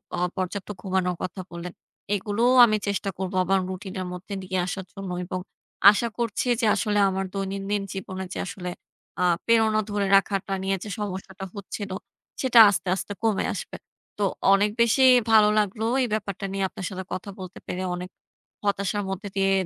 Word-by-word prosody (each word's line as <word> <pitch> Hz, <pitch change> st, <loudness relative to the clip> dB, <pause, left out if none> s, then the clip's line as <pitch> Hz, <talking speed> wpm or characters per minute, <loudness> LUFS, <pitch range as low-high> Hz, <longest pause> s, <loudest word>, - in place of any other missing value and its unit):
অ -, -, -4 dB, 0.2 s
পর্যাপ্ত 185 Hz, +2 st, -3 dB
ঘুমানোর 185 Hz, -1 st, 0 dB
কথা 185 Hz, +1 st, -4 dB
বললেন 170 Hz, 0 st, -7 dB, 0.4 s
এগুলোও 215 Hz, +5 st, +1 dB
আমি 215 Hz, -2 st, +2 dB
চেষ্টা 200 Hz, 0 st, -1 dB
করবো 185 Hz, 0 st, -3 dB
আমার 195 Hz, +1 st, +3 dB
রুটিনের 190 Hz, 0 st, -5 dB
মধ্যে 180 Hz, +3 st, -8 dB
নিয়ে 185 Hz, 0 st, -3 dB
আসার 190 Hz, 0 st, -4 dB
জন্য। 195 Hz, -2 st, -6 dB
এবং 185 Hz, +1 st, -4 dB, 0.5 s
আশা 225 Hz, +3 st, 0 dB
করছি 235 Hz, +1 st, -1 dB
যে -, -, +2 dB
আসলে 210 Hz, -1 st, +1 dB
আমার 190 Hz, 0 st, -2 dB
দৈনন্দিন 195 Hz, +1 st, -2 dB
জীবনে 190 Hz, -1 st, -5 dB
যে -, -, -5 dB
আসলে 180 Hz, -1 st, -5 dB, 0.5 s
আ -, -, +3 dB, 0.2 s
প্রেরণা 220 Hz, -2 st, +4 dB
ধরে 205 Hz, -1 st, 0 dB
রাখাটা 195 Hz, 0 st, +1 dB
নিয়ে 195 Hz, 0 st, +1 dB
যে 215 Hz, -, -7 dB
সমস্যাটা 190 Hz, -1 st, -5 dB
হচ্ছিল 200 Hz, 0 st, -6 dB, 0.5 s
সেটা 250 Hz, -3 st, +5 dB
আস্তে, 195 Hz, -1 st, -2 dB
আস্তে 190 Hz, +2 st, -5 dB
কমে 220 Hz, -3 st, +2 dB
আসবে। -, -, -6 dB, 0.4 s
তো 205 Hz, -, -1 dB, 0.3 s
অনেক 205 Hz, +1 st, +4 dB
বেশি 235 Hz, +3 st, +4 dB, 0.3 s
ভালো 215 Hz, -1 st, +7 dB
লাগলো 210 Hz, +1 st, -1 dB, 0.2 s
এই 250 Hz, -, +1 dB
ব্যাপারটা 200 Hz, -2 st, -3 dB
নিয়ে 195 Hz, 0 st, -1 dB
আপনার 185 Hz, -, -7 dB
সাথে 190 Hz, -1 st, -5 dB
কথা 185 Hz, -, -5 dB
বলতে 185 Hz, -1 st, -8 dB
পেরে। 185 Hz, +1 st, -3 dB
অনেক 180 Hz, +1 st, -6 dB, 0.5 s
হতাশার 200 Hz, 0 st, 0 dB
মধ্যে 195 Hz, +2 st, -4 dB
দিয়ে 195 Hz, 0 st, +2 dB
195 Hz, 170 wpm, -25 LUFS, 185-210 Hz, 0.5 s, ভালো